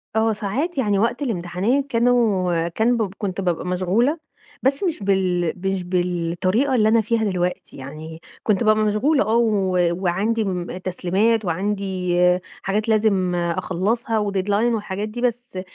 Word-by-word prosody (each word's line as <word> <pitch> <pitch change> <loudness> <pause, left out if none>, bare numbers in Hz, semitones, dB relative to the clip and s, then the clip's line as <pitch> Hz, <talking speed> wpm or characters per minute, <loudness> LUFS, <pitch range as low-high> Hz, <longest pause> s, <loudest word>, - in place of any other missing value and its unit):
آه، 220 0 +2
ساعات 255 - -3
يعني 205 -6 +1
وقت 235 +6 0
الامتحانات 220 +4 -1
كانوا 215 -9 +2
كان 230 +7 +1
ب 205 -4 -2
كنت 195 -2 -3
بابقى 175 -2 -1
مشغولة، 195 - +1 0.4
بس 275 +5 +1
مش 330 - -1
بال 185 -4 +1
مش 195 -1 -1
بالطريقة 180 +7 0
اللي 215 -3 +4
أنا 225 +1 +4
فيها 225 +1 0
دلوقتي، 180 -3 -2
يعني 155 +4 -9 0.2
كنت 210 0 +1
بابقى 215 0 +3
مشغولة 270 +8 +2
آه 220 +1 0
و 210 -5 +2 0.3
وعندي 210 +6 +1
م 180 -2 -3
تسليمات 190 +5 0
وعندي 185 0 -1 0.4
حاجات 210 +3 -1
لازم 200 -5 +2
أخلصها 185 +6 -1
و 205 -1 -1
deadline 205 +5 +1
والحاجات 205 -1 -4
دي، 240 +3 -6
بس 245 -5 -2
205 Hz, 145 wpm, -22 LUFS, 180-230 Hz, 0.4 s, اللي